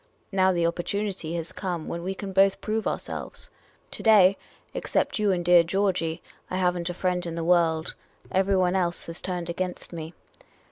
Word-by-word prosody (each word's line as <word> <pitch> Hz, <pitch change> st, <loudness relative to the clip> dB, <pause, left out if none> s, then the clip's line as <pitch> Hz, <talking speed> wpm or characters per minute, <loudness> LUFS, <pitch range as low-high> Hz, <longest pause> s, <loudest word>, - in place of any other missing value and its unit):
Now 190 Hz, -1 st, +4 dB
the 175 Hz, -2 st, 0 dB
oppor 170 Hz, +1 st, 0 dB
tunity 195 Hz, -5 st, -3 dB
has 165 Hz, 0 st, -3 dB
come 175 Hz, -5 st, -4 dB
when 170 Hz, -, -4 dB
we 190 Hz, +2 st, -3 dB
can 195 Hz, 0 st, -6 dB
both 195 Hz, +1 st, +4 dB
prove 220 Hz, +1 st, -2 dB
ourselves. -, -, -5 dB, 0.4 s
To -, -, -6 dB
day, 200 Hz, -4 st, +6 dB, 0.4 s
except -, -, -1 dB
you 210 Hz, -2 st, +3 dB
and 175 Hz, -2 st, -1 dB
dear 175 Hz, 0 st, +7 dB
Georgey, 175 Hz, -2 st, 0 dB, 0.3 s
I -, -, -3 dB
have 180 Hz, -1 st, +2 dB
n't 175 Hz, 0 st, -3 dB
a 175 Hz, -, -4 dB
friend 180 Hz, -1 st, 0 dB
in 170 Hz, -1 st, -4 dB
the 165 Hz, -, -2 dB
world. 165 Hz, -2 st, +2 dB, 0.4 s
Everyone 190 Hz, -1 st, +2 dB
else 175 Hz, -2 st, 0 dB
has 165 Hz, 0 st, -6 dB
turned 180 Hz, -2 st, -3 dB
against 180 Hz, +1 st, -4 dB
me. 160 Hz, 0 st, -7 dB
180 Hz, 185 wpm, -26 LUFS, 170-190 Hz, 0.4 s, dear